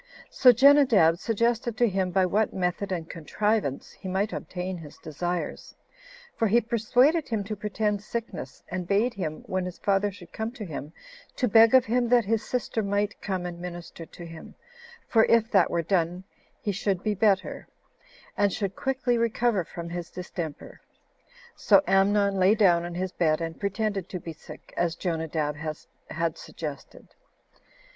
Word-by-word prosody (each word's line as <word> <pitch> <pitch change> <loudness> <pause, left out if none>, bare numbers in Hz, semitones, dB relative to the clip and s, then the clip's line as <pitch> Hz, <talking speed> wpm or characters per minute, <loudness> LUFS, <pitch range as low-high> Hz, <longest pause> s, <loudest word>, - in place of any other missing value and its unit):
So 255 - +7
Jenadab 245 - +5
suggested 230 +1 0
to 240 - +4
him 190 -2 0
by 185 +1 +2
what 210 +4 0
method 185 +2 -1
and 170 -3 -3
contrivance 185 -2 -1
he 190 - -10
might 195 +3 -1
obtain 180 0 -5
his 150 -3 -12
desires; 175 +3 -4 0.6
for 225 - +1
he 225 +4 +4
persuaded 245 +7 +2
him 220 -5 -1
to 210 +2 -5
pretend 210 0 -1
sickness, 230 +2 -6
and 180 -1 -4
bade 215 +6 +2
him, 155 -5 -5
when 185 0 -2
his 180 -1 -6
father 200 0 +1
should 185 -3 -14
come 220 0 -3
to 225 -5 -7
him, 150 -3 -7 0.4
to 250 - +1
beg 225 +2 +6
of 255 - +6
him 240 +1 +1
that 240 -2 +4
his 220 +1 0
sister 245 -2 -2
might 205 0 -1
come 185 -3 -3
and 175 -1 -6
minister 175 -1 -8
to 175 - -11
him; 165 -1 -11 0.5
for 225 -1 +4
if 230 0 +3
that 195 -5 +4
were 170 -1 0
done, 175 0 0 0.4
he 205 - -2
should 195 -1 -1
be 215 - +1
better, 200 -1 +1 0.7
and 205 -1 +2
should 195 -1 -3
quickly 260 -3 0
recover 230 -3 +1
from 170 +1 -8
his 175 -1 -5
distemper. 175 -4 -7 0.7
So - - +5
Amnon 200 0 +3
lay 190 +3 +5
down 175 -5 +4
on 175 0 -6
his 185 +1 -2
bed, 155 -4 +1
and 165 -1 -5
pretended 200 -2 -2
to 180 - -5
be 165 0 -7
sick, 155 - -13
as 170 -1 0
Jonadab 160 -4 -2 0.5
had 165 0 -2
suggested. 150 -4 -8
195 Hz, 165 wpm, -26 LUFS, 175-220 Hz, 0.7 s, So